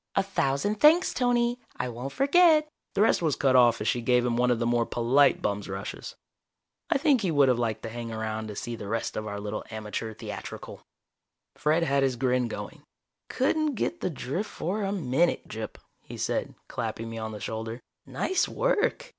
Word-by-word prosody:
A 195 - +3
thousand 195 +2 0
thanks, 320 +4 +5
Tony. 245 -1 +1 0.2
I 125 - -2
won't 125 +3 -5
forget 305 - +5
" - - -54
The 200 - +4
rest 220 - +3
was 155 -4 +1
cut 135 -2 +2
off 120 -3 +5
as 105 - -2
she 120 +2 +1
gave 125 +1 +3
him 120 -1 +1
one 125 +1 +2
of 120 - +3
the 115 - -1
more 120 0 +1
polite 130 +4 +3
bum's 100 0 -2
rushes. 95 +1 -6 0.7
I - - +3
think 280 -4 +3
he 190 - 0
would 145 -4 +4
have 125 -2 +2
liked 110 -2 -1
to 115 - -4
hang 115 0 -6
around 110 0 -3
to 105 - -7
see 120 +3 -4
the 105 -3 -8
rest 115 +2 -2
of 110 0 -3
our 100 -1 -4
little 105 +1 -4
amateur 110 0 -4
theatrical. - - -8 0.7
Fred 155 +3 +1
had 140 -3 +2
his 135 -2 +1
grin 125 0 +1
going. - - -7 0.5
"Couldn't 300 +2 +1
get 345 +9 -2
the - - 0
drift 155 +7 -4
for 195 +6 -3
a 195 -1 -1
minute, 170 -2 +1
Gyp," - - -6 0.2
he - - -10
said, - - -2
clapping 115 0 -4
me 115 0 -6
on 110 0 -4
the 105 - -7
shoulder. 110 +2 -5 0.3
"Nice 375 - 0
work! - - 0
125 Hz, 200 wpm, -27 LUFS, -, 0.7 s, thanks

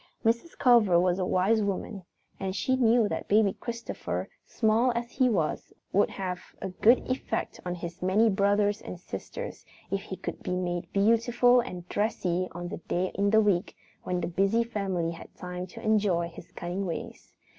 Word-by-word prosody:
Mrs. 235 +9 0
Culver 225 -9 +5
was 180 +1 +2
a 185 - +1
wise 205 +5 +3
woman, 200 0 -3 0.4
and 190 -1 -3
she 260 +7 +1
knew 235 -3 +4
that - - -4
Baby 205 -2 +4
Christopher, 235 -1 -5
small 225 +2 +2
as 235 0 -3
he 255 -1 +3
was, 175 -9 -1 0.2
would 200 - +4
have 180 -2 -4 0.2
a 190 - -4
good 220 +7 +4
effect 255 +1 -2
on 180 - -2
his 170 0 -7
many 195 +5 +3
brothers 205 0 +2
and 180 - -8
sisters - - -7 0.3
if 195 0 0
he 195 -2 -6
could - - -6
be 180 - -2
made 175 -1 -3
beautiful 230 +4 +4
and 180 -8 -5
dressy 185 -4 0
on 175 0 -6
the 210 - -5
one - - -19
day 180 +1 0
in 200 +1 +1
the 220 +1 +5
week 200 -5 +1 0.3
when 180 -1 -2
the - - -1
busy 195 +6 +2
family 195 -7 -2
had 165 - -10
time 180 0 -6
to - - -11
enjoy 200 -6 +2
his - - -13
cunning 180 +3 -4
ways. 170 - -7
200 Hz, 180 wpm, -28 LUFS, 180-225 Hz, 0.4 s, Culver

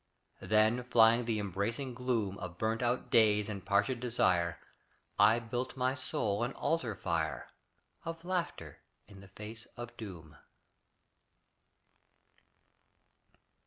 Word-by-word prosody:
Then 110 +5 +3
flying 115 0 +5
the 115 -2 0
embracing 105 +6 -2
gloom 115 -6 -1
Of 85 -2 -7
burnt 110 +2 0
out 125 +1 -1
days 105 -4 +4
and 100 -3 -5
parched 105 +7 +1
desire, 90 -8 +1 0.6
I 110 +3 +7
built 120 +3 -4
my 130 0 +1
soul 110 -5 -2
an 125 - -2
altar 130 -10 -1
fire 80 -4 -2 0.5
Of 165 0 -6
laughter 170 - -3 0.3
in 100 -2 -13
the 100 - -13
face 105 +4 -10
of 120 0 -7
doom. 85 -8 -9
110 Hz, 115 wpm, -33 LUFS, 100-125 Hz, 0.6 s, I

